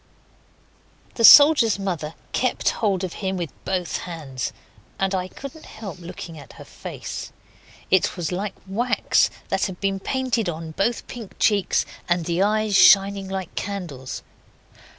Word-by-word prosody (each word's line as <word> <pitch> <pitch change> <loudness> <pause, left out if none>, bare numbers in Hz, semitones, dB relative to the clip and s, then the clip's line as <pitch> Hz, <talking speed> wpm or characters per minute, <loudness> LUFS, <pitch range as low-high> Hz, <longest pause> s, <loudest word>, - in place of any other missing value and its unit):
The 230 - -2
soldier's 285 -5 +8
mother 175 -6 -4 0.2
kept 255 - +1
hold 200 -4 0
of 185 - -3
him 190 -1 -1
with 170 -6 -4
both 180 -3 -1
hands, 145 -8 -5 0.5
and 195 0 0
I 185 -1 -1
couldn't 275 +9 -10
help 205 -4 -8
looking 170 -2 -9
at 140 - -13
her - - -12
face. - - -7 0.6
It 190 0 +3
was 170 -2 -2
like 195 +3 -3
wax 235 +6 +1 0.2
that - - +1
had 185 -2 -8
been 195 -1 -1
painted 250 -3 -1
on 160 -1 -6
both 210 +8 -1
pink 230 -5 -9
cheeks, 205 -3 +2 0.2
and 175 -1 +1
the 170 +2 0
eyes 215 0 +1
shining 195 0 +6
like 190 -2 -5
candles. 170 -10 -5
190 Hz, 145 wpm, -23 LUFS, 175-215 Hz, 0.6 s, soldier's